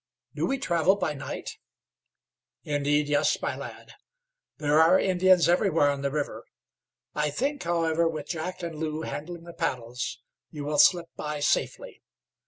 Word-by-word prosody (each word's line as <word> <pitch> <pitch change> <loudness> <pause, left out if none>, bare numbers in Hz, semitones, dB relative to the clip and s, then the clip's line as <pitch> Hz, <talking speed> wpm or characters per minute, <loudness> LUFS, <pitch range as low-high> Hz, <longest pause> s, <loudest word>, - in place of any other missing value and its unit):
"Do - - -1
we 270 - 0
travel 180 - +2
by 180 -6 -1
night?" 140 - -7 1.0
"Indeed, 145 0 +1
yes, 145 0 +2
my - - -2
lad. - - -9 0.7
There 150 +1 +3
are 165 +4 +6
Indians 185 -2 +4
everywhere 170 -5 +3
on 140 -1 -4
the 140 - 0
river. 145 0 -3 0.7
I 150 0 0
think, 275 - -2
however, 165 -1 +1
with 155 -3 -5
Jack 175 +2 -4
and 165 -2 -5
Lew 155 0 -3
handling 170 +3 -6
the 170 0 -10
paddles, 125 -3 -3 0.3
you 150 -2 -7
will 150 0 0
slip 170 +3 +5
by 150 0 -4
safely. 145 - -1
160 Hz, 150 wpm, -27 LUFS, 145-175 Hz, 1.0 s, are